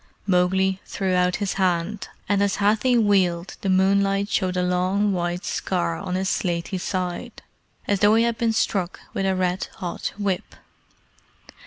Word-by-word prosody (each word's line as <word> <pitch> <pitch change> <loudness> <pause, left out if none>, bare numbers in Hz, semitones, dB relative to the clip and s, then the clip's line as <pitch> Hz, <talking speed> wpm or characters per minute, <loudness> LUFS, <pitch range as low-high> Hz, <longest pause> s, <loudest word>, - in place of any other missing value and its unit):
Mowgli 190 0 +2
threw 190 -2 -2
out 180 0 +2
his 200 -1 -2
hand, 185 +3 0 0.2
and 200 -1 +2
as 200 -1 +2
Hathi 220 +5 +2
wheeled 190 -5 +2
the 195 - -1
moonlight 195 +1 +2
showed 185 -4 0
a 180 - +1
long 185 +3 +1
white 175 0 -2
scar 85 -1 -1
on 180 - -4
his 190 +1 -1
slaty 175 +1 -1
side, 180 -1 -4 0.4
as 200 -1 +1
though 205 +2 +5
he 225 - +4
had 235 -1 -1
been 230 -1 +2
struck 195 -5 -1
with 195 - -1
a 190 - +1
red 185 0 -1
hot 180 -4 -4
whip. 200 -3 -2
190 Hz, 160 wpm, -23 LUFS, 180-200 Hz, 0.4 s, though